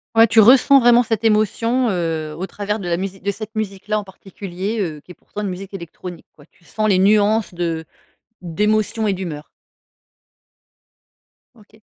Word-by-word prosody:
Ouais. 225 +1 +7
Tu 225 - +4
ressens 260 +5 +7
vraiment 240 -1 +5
cette 225 -1 -2
émotion, 230 +3 +2
heu, 165 -5 -2
au 190 - -4
travers 210 +2 -4
de 180 - -6
la 170 - +1
musi 195 +1 -5
de 200 +2 -2
cette 215 +2 -8
musique-là, 210 0 -2
en - - -6
particulier, 195 +2 -6
heu, 160 -7 -3
qui 180 - -15
est - - -9
pourtant 205 - -9
une 205 - -2
musique 190 +2 -8
électronique, 175 -1 -9
ouais. 145 - -17
Tu - - -30
sens 215 +4 -2
les 185 -2 +3
nuances 210 +1 +3
de 165 -2 -3 0.6
d'émotion 210 +5 0
et 200 - +2
d'humeur. 170 -6 -6 2.1
OK. 220 0 -22
200 Hz, 170 wpm, -20 LUFS, 180-215 Hz, 2.1 s, Ouais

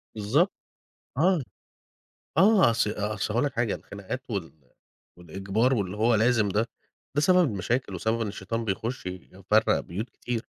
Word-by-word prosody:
بالضبط. 125 - +2 0.7
آه، 175 0 +3 1.0
آه. 195 - +6
أص 115 -1 +1
أصل 105 -1 -2
هاقول 120 - +2
لك 140 - -2
حاجة، 120 -3 +1
الخناقات 100 +6 -7
وال 95 -6 -3 0.7
والإجبار 95 +9 0
واللي 100 -3 -2
هو 115 +2 +3
لازم 110 -1 +3
ده، 110 +4 0 0.5
ده 145 - +2
سبب 180 +3 +5
المشاكل 100 +2 -1
وسبب 110 +6 -1
إن 110 - -1
الشيطان 115 +4 -4
بيخش 110 +2 -3
يفرّق 95 +3 0
بيوت 105 +8 -5
كتير، 120 -2 -4
110 Hz, 140 wpm, -27 LUFS, 100-125 Hz, 1.0 s, آه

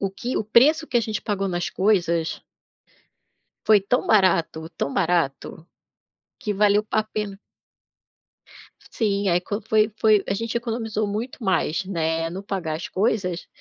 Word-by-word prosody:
o 195 -1 -1
que 240 +6 -4
o - - +1
preço 290 +9 +4
que 245 - -2
a - - +4
gente 220 -2 -3
pagou 195 -2 -2
nas 175 -1 -2
coisas 170 -5 0 1.2
foi 215 -2 +6
tão 200 +6 -1
barato, 170 -5 +2
tão 140 - -3
barato, 165 -2 -1 0.7
que 210 - -2
valeu 205 +1 +3
pa 215 0 0
pena. 210 -2 -5 1.5
Sim, 200 -3 0
aí 175 - +3
quan 205 +4 -5
foi 215 0 +2
foi 215 -2 +4
a - - 0
gente 230 +3 -2
economizou 225 -3 -3
muito 225 +6 -5
mais, 190 -3 0
né, 165 -3 -1
no 190 +3 -7
pagar 180 -6 -3
as 165 - -6
coisas, 190 -4 -1
200 Hz, 150 wpm, -23 LUFS, 175-220 Hz, 1.5 s, foi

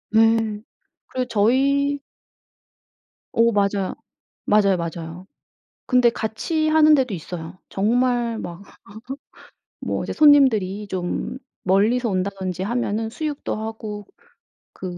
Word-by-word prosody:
예. 225 -1 +3 0.5
그 255 -1 -1
저희 275 +6 +2 1.3
어 230 0 +4
맞아요. 200 -2 0 0.5
맞아요, 200 -3 +4
맞아요. 170 +1 -6 0.6
근데 250 -2 +4
같이 310 +9 -2
하는 310 -1 +6
데도 255 -6 0
있어요. 170 +1 -7
정말 240 +2 +1
막 175 +1 -7 1.2
뭐 - - -1
이제 - - -4
손님들이 220 -10 +4
좀 185 +6 -3 0.3
멀리서 220 +6 +2
온다든지 190 -1 -2
하면은 225 0 -1
수육도 300 +2 -4
하고 215 -2 -6 0.7
그 - - -11
220 Hz, 210 characters per minute, -22 LUFS, 195-250 Hz, 1.3 s, 하는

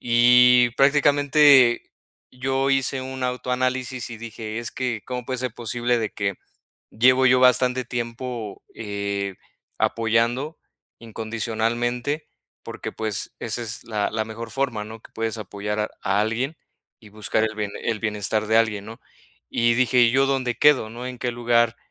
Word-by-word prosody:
Y 125 +1 +5
prácticamente, 145 -2 +5 0.4
yo 135 +2 -1
hice 135 0 +1
un 130 0 -5
autoanálisis 125 0 -2
y 115 - -7
dije: 110 -1 -6
"Es 120 - -4
que 125 -4 -3
cómo 125 -1 -4
puede 130 -1 -3
ser 125 -2 -3
posible 120 +1 -1
de 110 -2 -2
que, 100 -1 -2 0.6
llevo 130 +3 +4
yo 130 0 +5
bastante 125 0 +3
tiempo, 120 -2 -5
eh, 100 -2 -4 0.4
apoyando, 115 +7 0 0.4
incondicionalmente", 115 +5 -2 0.4
porque - - -6
pues, 110 -2 -3
esa 120 +1 -2
es 110 -1 -6
la 105 -3 -2
la 110 0 -2
mejor 110 +1 -8
forma, 125 -3 -2
¿no?, 110 +1 -10
que - - -17
puedes 115 0 -3
apoyar 105 +1 -4 0.2
a 100 +1 +1
alguien 120 +8 -1 0.4
y 110 -3 -16
buscar 110 +1 -1
el 110 0 -2
bien 105 -1 -2
el 110 -2 -2
bienestar 105 0 -1
de 110 - +3
alguien, 105 -3 0
¿no?, 115 +2 -10 0.5
y 120 0 +2
dije: 125 +1 +2
"¿Y 120 -1 +6
yo 135 +1 +3
dónde 130 -4 -1
quedo? 145 -7 +4
¿No? 120 +2 -7
¿En 125 -1 -7
qué 125 - -2
lugar 120 -1 +2
120 Hz, 155 wpm, -23 LUFS, 110-130 Hz, 0.6 s, Y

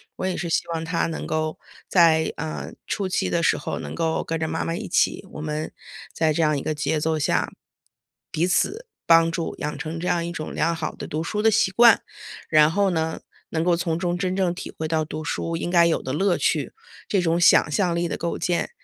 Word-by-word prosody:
我 - - -4
也 185 -1 -1
是 170 - -3
希 - - +1
望 160 0 -2
他 165 +1 0
能 165 - -5
够 155 0 -2 0.3
在， 160 -3 +4
嗯， 155 - -5
初 200 -3 -1
期 - - 0
的 170 -1 0
时 - - +3
候 - - -4
能 - - -6
够 165 -1 -1
跟 165 0 -3
着 160 - -1
妈 160 +1 -2
妈 165 - -2
一 - - -5
起， 185 - +1
我 - - -7
们 155 0 -3 0.4
在 160 -1 +1
这 155 - 0
样 150 -2 +2
一 140 - -3
个 155 - -2
节 150 +1 -1
奏 160 0 0
下， 140 - 0 0.8
彼 170 +3 +1
此 430 - 0 0.2
帮 165 0 +6
助， 165 0 -3
养 150 0 -4
成 160 +1 -5
这 180 - -3
样 170 -1 +1
一 170 - -4
种 155 -2 -6
良 165 +2 +1
好 160 -1 -4
的 - - -7
读 155 +1 -3
书 210 +4 -2
的 220 +1 +4
习 190 -2 +2
惯。 235 +2 +6 0.5
然 155 0 +5
后 200 +2 +2
呢， 160 -1 -1 0.3
能 160 - -1
够 175 0 +3
从 170 -1 -1
中 175 -1 -1
真 185 0 -1
正 185 -3 +1
体 - - -7
会 160 - -2
到 160 0 +1
读 155 0 -6
书 165 +2 -2
应 170 - -3
该 170 -1 +5
有 165 - +1
的 130 - -4
乐 185 +4 +2
趣， - - 0 0.4
这 195 -3 +2
种 170 0 +1
想 175 - +5
象 175 +3 +1
力 170 +1 0
的 - - -3
构 170 0 -3
建。 175 -1 -1
165 Hz, 250 characters per minute, -24 LUFS, 160-175 Hz, 0.8 s, 帮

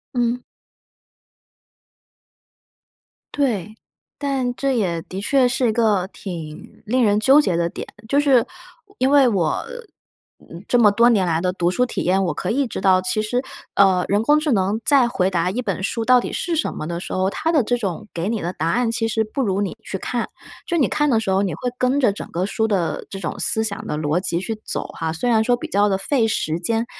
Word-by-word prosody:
嗯。 245 0 0 2.9
对。 220 -8 -1 0.4
但 270 -3 -1
这 270 -1 0
也 175 -6 -1
的 185 +3 -7
确 255 +5 +2
是 250 0 +1
一 - - +2
个 215 -5 +2
挺 165 -6 -9
令 250 +4 +1
人 205 -1 +3
纠 270 +7 +6
结 185 - 0
的 170 0 +1
点， - - -7 0.2
就 280 +5 +2
是， 275 -3 +4 0.5
我 400 - -25
因 260 - +3
为 280 -2 +5
我， 185 -9 0 0.8
嗯， 170 +3 -10
这 245 - +2
么 215 -3 +6
多 235 +4 +4
年 200 -6 +2
来 165 -1 0
的 180 0 0
读 175 -1 0
书 250 +7 +1
体 245 - -4
验， 190 +2 +2
我 175 -4 -1
可 - - -4
以 275 +5 +1
知 235 - -5
道， 190 -1 +4
其 185 +3 0
实， 245 +5 -1 0.3
呃， 190 -2 +4
人 205 +2 +1
工 295 +5 +4
智 305 -3 0
能 200 +1 +1
在 270 -5 +4
回 185 -5 0
答 180 -1 0
一 240 +6 -2
本 195 -5 -3
书 225 +3 -2
到 250 0 +5
底 - - -5
是 345 - -2
什 320 - -1
么 155 - -6
的 170 0 -4
时 - - -7
候， 185 +1 +1
它 325 - -1
的 300 -6 +3
这 245 - 0
种 210 -2 -4
给 170 +4 -2
你 225 -2 -2
的 175 +2 -3
答 160 -1 -2
案 240 +5 +1
其 225 -1 -1
实 220 0 0
不 265 +5 -3
如 195 -2 0
你 200 - -3
去 195 - -5
看。 235 +5 -3 0.4
就 345 - -1
你 285 - +3
看 295 0 +1
的 230 -4 +3
时 220 - -3
候， 190 +1 +2
你 195 -4 -1
会 245 - -3
跟 255 +3 +1
着 240 -7 +3
整 - - -8
个 180 +2 -1
书 220 +2 -1
的 195 -6 -1
这 195 - -7
种 165 - -4
思 220 - +3
想 215 0 -3
的 150 - -3
逻 155 +3 0
辑 175 -2 +1
去 220 +4 -4
走 - - -3
哈， 160 -1 -3
虽 175 +10 -2
然 220 -2 +3
说 245 +1 +2
比 - - -6
较 205 +1 +2
地 195 - +1
费 230 +5 +1
时 160 -6 -1
间， 225 +5 0
215 Hz, 240 characters per minute, -21 LUFS, 185-245 Hz, 2.9 s, 纠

